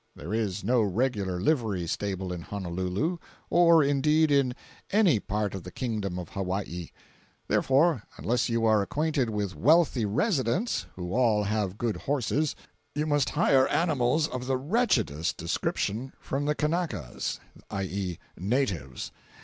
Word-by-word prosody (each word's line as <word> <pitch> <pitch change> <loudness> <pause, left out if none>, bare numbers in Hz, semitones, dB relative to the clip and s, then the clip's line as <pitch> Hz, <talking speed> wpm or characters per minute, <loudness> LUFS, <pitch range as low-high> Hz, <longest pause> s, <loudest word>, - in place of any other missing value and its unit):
There 85 +8 -6
is 105 -4 -1
no 120 +3 +3
regular 100 -3 0
livery 105 - +1
stable 95 +1 -3
in 90 - -5
Honolulu, 95 - -2 0.3
or, 170 -2 +6
indeed, 150 +2 +3
in 135 -3 +3 0.3
any 195 - +4
part 105 0 -2
of 95 - -5
the 90 - -8
Kingdom 105 -5 -3
of 90 -3 -6
Hawaii; 95 -3 -3 0.6
therefore 140 0 +3 0.2
unless 120 +2 0
you 115 -1 +1
are 110 -2 +4
acquainted 145 +3 0
with 105 -3 -2
wealthy 155 -4 +4
residents 160 - 0
(who 90 0 -5
all 115 -4 +3
have 105 -2 -1
good 115 -2 -1
horses), 145 +2 0 0.4
you 150 +1 0
must 145 -3 +2
hire 130 -1 +4
animals 150 -2 +2
of 125 -3 -5
the 135 -1 +1
wretchedest 130 - +1
description 105 +8 -2
from 140 +2 -3
the 150 0 +1
Kanakas. 155 - -2 0.3
(i.e. 95 -2 -3 0.2
natives.) 95 - -2
115 Hz, 135 wpm, -28 LUFS, 95-145 Hz, 0.6 s, or